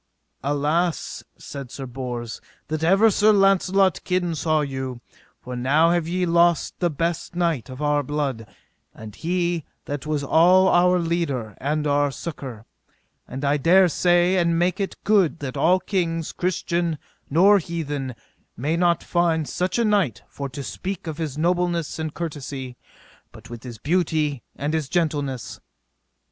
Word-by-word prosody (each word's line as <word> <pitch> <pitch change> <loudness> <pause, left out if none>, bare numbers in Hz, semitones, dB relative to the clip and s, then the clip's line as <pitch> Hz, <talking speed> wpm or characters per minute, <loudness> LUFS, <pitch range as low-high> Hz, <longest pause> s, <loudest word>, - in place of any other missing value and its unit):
Alas, 150 +5 -1
said 140 -3 -8
Sir 135 +2 -7
Bors, 120 -3 -6 0.3
that 155 0 -2
ever 195 +6 +5
Sir 210 +2 +4
Launcelot's 195 -1 +3
kin 180 -2 -1
saw 155 0 +1
you, 130 -3 -4 0.4
for 125 0 -7
now 145 +7 +3
have 175 -2 +1
ye 180 +1 0
lost 170 -1 +2
the 175 - +2
best 170 +2 -2
knight 165 - 0
of 130 +3 -6
our 145 0 +2
blood, 140 -5 -3 0.5
and 110 -2 -10
he 175 -1 -1 0.2
that 145 0 -5
was 150 -2 -1
all 180 +6 +5
our 180 +1 +4
leader 165 - -1
and 150 +2 -1
our 145 0 +2
succour; 135 -6 -7 0.6
and 135 +3 -5
I 140 +1 +2
dare 180 +6 +5
say 175 +2 +3
and 170 -2 +2
make 180 +2 +1
it 195 - -3
good 195 -7 +3
that 140 -4 -6
all 170 +6 +3
kings, 165 -5 -2
christian 175 -2 -1 0.3
nor 195 +7 +6
heathen, 145 -7 -4 0.4
may 150 +7 0
not 170 -1 +2
find 165 -3 +1
such 180 +3 -1
a 235 - +2
knight, 200 - +1
for 140 -1 -6
to 140 +1 -7
speak 190 +6 -5
of 160 -1 -5
his 150 -4 -3
nobleness 175 -1 0
and 160 -1 -3
courtesy, 140 -6 -6 0.7
with 120 -1 -8
his 120 -3 -8
beauty 155 - 0
and 145 +2 -2
his 155 -4 -1
gentleness. 145 -7 -2
160 Hz, 150 wpm, -23 LUFS, 140-175 Hz, 0.7 s, nor